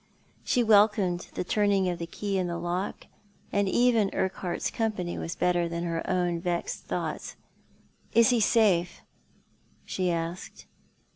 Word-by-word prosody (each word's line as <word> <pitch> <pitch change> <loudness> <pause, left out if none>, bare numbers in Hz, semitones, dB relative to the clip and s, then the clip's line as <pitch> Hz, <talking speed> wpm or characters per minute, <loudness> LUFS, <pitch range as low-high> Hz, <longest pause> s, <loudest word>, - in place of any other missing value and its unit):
She 245 - +2
welcomed 205 -5 +3
the - - -1
turning 200 0 +2
of 175 -1 -2
the 170 - -4
key 195 +2 -2
in 180 - -1
the 170 -1 -3
lock, 175 +3 -3 0.5
and 200 -1 +1
even 235 -3 +3
Urquhart's 185 -2 -2
company 205 -6 -2
was 165 - -4
better 175 -1 +1
than 170 0 -3
her 165 -1 -2
own 175 -2 0
vexed 175 -1 -3
thoughts. - - -4 0.4
" - - -35
Is 230 +1 +5
he 245 - +3
safe? 200 -6 +2 0.4
" - - -39 0.3
she 185 -1 -1
asked. 170 +1 -4
185 Hz, 150 wpm, -27 LUFS, 175-205 Hz, 0.5 s, Is